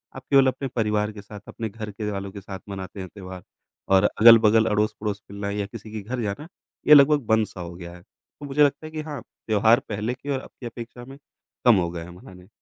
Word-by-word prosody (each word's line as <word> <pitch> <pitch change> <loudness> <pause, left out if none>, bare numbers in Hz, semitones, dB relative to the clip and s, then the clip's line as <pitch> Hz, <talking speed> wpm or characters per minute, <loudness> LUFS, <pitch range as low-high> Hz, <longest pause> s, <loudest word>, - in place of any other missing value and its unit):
आप - - -9
केवल 135 -1 +6
अपने 135 +1 -1
परिवार 105 -2 0
के 105 -1 -10
साथ, 105 +1 -11
अपने 110 -1 -5
घर 105 0 -7
के 105 +1 -4
वालों 100 -1 -5
के 100 0 -9
साथ 95 0 -8
मनाते 95 0 -7
हैं 95 -1 -6
त्योहार 95 -3 -9 0.5
और 95 0 +5 0.2
अगल-बगल, 115 -1 +7
अड़ोस-पड़ोस 105 -1 -1
मिलना 100 0 -4
या 100 0 -2
किसी 105 +2 -10
के 110 -1 -5
घर 125 -1 -2
जाना, 105 +8 -4 0.4
ये 150 - +9
लगभग 145 -2 +6
बंद 110 -1 +3
सा - - -12
हो 85 0 -7
गया 85 -1 -9
है। 90 - -14
तो 145 - -16
मुझे 145 +1 +3
लगता 145 +2 +1
है 155 - -8
कि 155 -1 -4
हाँ, 150 -4 -6 0.3
त्योहार 110 +2 +4
पहले 105 +3 -2
की 140 +3 -10
और 135 -2 0
अब - - -13
की 125 - -9
अपेक्षा 120 +1 -8
में, 135 +2 -12 0.5
कम 120 -2 +7
हो 90 -3 +1
गए 85 -1 -6
हैं 85 - -11
मनाने। 90 0 -14
105 Hz, 240 wpm, -24 LUFS, 100-125 Hz, 0.5 s, ये